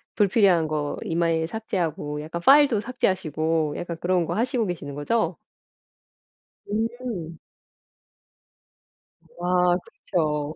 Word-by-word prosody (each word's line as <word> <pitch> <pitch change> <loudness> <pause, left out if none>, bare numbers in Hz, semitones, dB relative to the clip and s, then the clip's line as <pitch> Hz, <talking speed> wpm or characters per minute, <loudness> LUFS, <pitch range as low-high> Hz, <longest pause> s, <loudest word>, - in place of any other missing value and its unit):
불필요한 195 -5 +4
거 150 -1 -2
이메일 165 -1 0
삭제하고 165 -8 -3
약간 160 +3 -5
파일도 280 -5 +6
삭제하시고 160 - 0
약간 170 -1 -5
그런 180 -1 +1
거 - - -2
하시고 235 -1 0
계시는 160 -5 -5
거죠? 220 +11 0 1.3
음. 220 -7 -3 2.0
우와 180 0 +2
그렇죠. 150 -3 -2
175 Hz, 235 characters per minute, -25 LUFS, 160-215 Hz, 2.0 s, 파일도